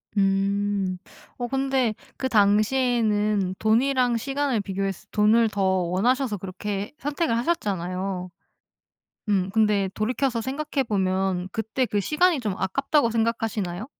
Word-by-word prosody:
음. 195 -1 +1 0.4
어 245 - -3
근데 265 -3 0 0.2
그 260 - -2
당시에는 210 -2 +2
돈이랑 245 +2 +2
시간을 270 -2 -1
비교했을 195 +1 -3
때 - - -50
돈을 220 +2 +4
더 200 - -3
원하셔서 195 +6 +1
그렇게 195 +4 -5
선택을 290 -4 -1
하셨잖아요. 190 - -2 1.0
음 190 -2 +1
근데 210 -3 +2
돌이켜서 245 +2 0
생각해 275 +2 -2
보면 190 -3 0
그때 225 +3 -1
그 205 -3 0
시간이 305 - +2
좀 210 -5 -2
아깝다고 275 +6 +1
생각하시나요? 225 -4 -1
215 Hz, 285 characters per minute, -25 LUFS, 195-255 Hz, 1.0 s, 돈을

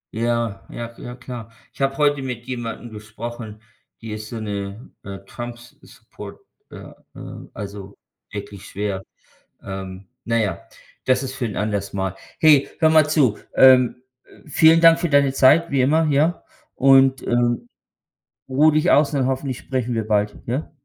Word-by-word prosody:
Ja, 115 -3 -1
ja, 120 0 -7
ja, 120 - -8
klar. 120 -2 -9 0.2
Ich - - -12
habe 135 0 0
heute 145 -2 +2
mit 125 -2 -6
jemandem 120 -2 -6
gesprochen, 110 +1 -8 0.4
die 115 -1 -8
ist 110 0 -6
so 115 - -6
'ne, 100 +1 -6
äh, 100 -1 -8
Trumps-support, 120 +2 -11 0.3
äh, - - -12 0.4
äh, - - -9
also 100 -1 -8 0.3
wirklich 100 -1 -8
schwer. 100 -1 -3 0.6
Ähm, 95 0 -7 0.2
naja, 115 -4 -1 0.4
das 130 +1 +2
ist 130 0 -5
für 125 - -3
'n 105 - -4
anderes 100 -1 -2
Mal. 95 -1 -2 0.3
Hey, 150 -3 +6
hör 160 - +5
mal 155 -1 +4
zu, 135 -9 +2 0.2
ähm, 130 -1 +5 0.4
vielen 160 +3 +5
Dank 165 0 +7
für 175 - 0
deine 140 -2 +3
Zeit, 140 +5 +4
wie 140 - +1
immer, 150 +5 +3
ja, 155 +5 +1 0.3
und, 135 -1 +4
ähm, 120 0 0 0.8
ruhe 150 +4 +4
dich 155 - +2
aus, 145 0 +4
und 140 -2 0
dann 130 - +1
hoffentlich 130 -1 -2
sprechen 125 -3 -3
wir 110 - -2
bald, 105 -1 0
ja? 130 +8 -3
120 Hz, 155 wpm, -21 LUFS, 105-135 Hz, 0.8 s, Dank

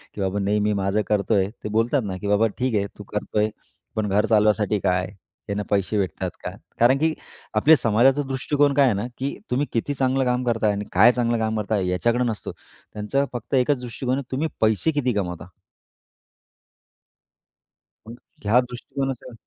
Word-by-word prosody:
की 105 - -4
बाबा 95 +1 -1
नेहमी 105 +1 +1
माझं 100 +1 0
करतोय 100 -1 +1
ते - - -3
बोलतात 115 +5 +1
ना 95 -2 -4
की 105 - -3
"बाबा 105 +2 +3
ठीक 125 -2 0
आहे, 100 -1 +1
तू - - -7
करतोय, 105 +1 -1 0.5
पण 110 -1 -1
घर 100 +2 +2
चालवायसाठी 105 -1 +3
काय? 90 -1 0 0.4
त्यानं 105 0 -2
पैसे 100 +1 0
भेटतात 95 -5 -2
का?" - - -3 0.3
कारण 120 +3 +5
की 160 0 +2 0.4
आपल्या 150 +9 +6
समाजाचा 125 +4 +3
दृष्टिकोन 140 +2 +1
काय 140 0 +5
आहे 125 - +3
ना 105 +4 -2
की 135 +2 -3
तुम्ही 135 +4 +1
किती 120 +5 -1
चांगलं 130 0 +1
काम 125 0 0
करताय 115 -3 +1
आणि 105 +1 -4
काय 110 +7 +7
चांगलं 120 -1 0
काम 110 0 -1
करताय 100 -3 -1
याच्याकडं 120 +7 +1
नसतो, 110 -3 -4 0.4
त्यांचं 110 +7 0
फक्त 120 +3 -3
एकच 130 +1 +2
दृष्टिकोन 125 +2 -2
आहे 135 -2 -7
तुम्ही 145 +5 0
पैसे 110 +8 +2
किती 135 -5 0
कमवता? 90 -4 -3 2.6
मग 115 - -8 0.3
ह्या 110 +5 +5
दृष्टिकोनाचा 125 +1 -5
110 Hz, 170 wpm, -23 LUFS, 105-130 Hz, 2.6 s, काय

